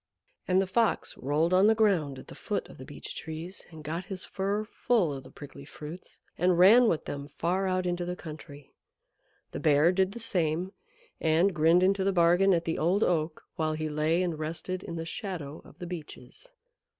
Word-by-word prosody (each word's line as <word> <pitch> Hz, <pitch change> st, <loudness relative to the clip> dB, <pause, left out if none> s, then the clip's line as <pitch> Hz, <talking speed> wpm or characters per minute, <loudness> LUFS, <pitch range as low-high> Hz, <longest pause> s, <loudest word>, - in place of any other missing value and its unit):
And 185 Hz, 0 st, +3 dB
the 195 Hz, -, +2 dB
Fox 225 Hz, +4 st, 0 dB
rolled 150 Hz, +6 st, 0 dB
on 190 Hz, +3 st, +6 dB
the 220 Hz, -, +5 dB
ground 180 Hz, -11 st, +2 dB
at -, -, -11 dB
the -, -, -10 dB
foot -, -, -3 dB
of -, -, -14 dB
the -, -, -8 dB
Beech -, -, -8 dB
Trees 160 Hz, +4 st, -7 dB
and 160 Hz, -2 st, -11 dB
got 165 Hz, +4 st, -4 dB
his 185 Hz, -1 st, -6 dB
fur 200 Hz, +2 st, -2 dB
full 215 Hz, -6 st, 0 dB
of 135 Hz, -, -6 dB
the 130 Hz, -, -13 dB
prickly 140 Hz, -1 st, -11 dB
fruits, 150 Hz, +5 st, -10 dB, 0.2 s
and 180 Hz, 0 st, +3 dB
ran 220 Hz, +7 st, +7 dB
with 165 Hz, -, 0 dB
them 140 Hz, 0 st, -5 dB
far 180 Hz, +6 st, -1 dB
out 185 Hz, 0 st, 0 dB
into 175 Hz, 0 st, -1 dB
the 180 Hz, +1 st, -3 dB
country. 150 Hz, -4 st, -11 dB, 0.8 s
The -, -, -5 dB
Bear 150 Hz, +2 st, +4 dB
did 190 Hz, +1 st, +1 dB
the 235 Hz, -, -7 dB
same, 180 Hz, -4 st, -1 dB, 0.5 s
and 165 Hz, +5 st, +3 dB
grinned 165 Hz, +2 st, +4 dB
into 195 Hz, +1 st, +2 dB
the 195 Hz, -, +2 dB
bargain 175 Hz, +2 st, +4 dB
at 170 Hz, -2 st, +1 dB
the 165 Hz, -, -2 dB
Old 180 Hz, +7 st, +2 dB
Oak 160 Hz, -2 st, -1 dB
while 155 Hz, -1 st, 0 dB
he 155 Hz, 0 st, -3 dB
lay 155 Hz, +4 st, +1 dB
and 170 Hz, -4 st, -2 dB
rested 165 Hz, +4 st, -4 dB
in 170 Hz, -, -7 dB
the 165 Hz, 0 st, -4 dB
shadow 165 Hz, -, -6 dB
of -, -, -17 dB
the 180 Hz, -, -7 dB
Beeches. 175 Hz, -, -9 dB
175 Hz, 200 wpm, -28 LUFS, 155-190 Hz, 0.8 s, ran